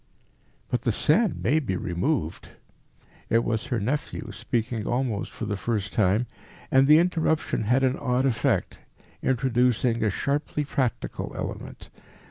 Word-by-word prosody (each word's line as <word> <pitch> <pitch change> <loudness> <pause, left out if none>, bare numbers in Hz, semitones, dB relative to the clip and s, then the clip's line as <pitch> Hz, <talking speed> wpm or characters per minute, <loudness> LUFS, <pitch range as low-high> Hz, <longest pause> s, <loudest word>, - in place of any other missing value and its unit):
"But - - +1
the - - +1
sand 90 0 +2
may 140 +11 +3
be 110 -11 -2
removed." 90 - -2 0.8
It 115 +1 +3
was 110 -2 -1
her 125 -4 -1
nephew, 130 +1 -3
speaking 115 +2 -2
almost 120 -4 -1
for 115 - -5
the 105 -1 -2
first 100 -1 -2
time, 105 +3 +2 0.5
and 135 +1 +5
the 150 +1 +8
interruption 160 -8 +1
had 125 +5 +3
an 130 0 +2
odd 125 +1 +1
effect, 130 -5 0 0.4
introducing 125 -2 +2
a 110 - +3
sharply 145 +7 -1
practical 130 -4 -2
element. - - -6
120 Hz, 135 wpm, -26 LUFS, 105-135 Hz, 0.8 s, the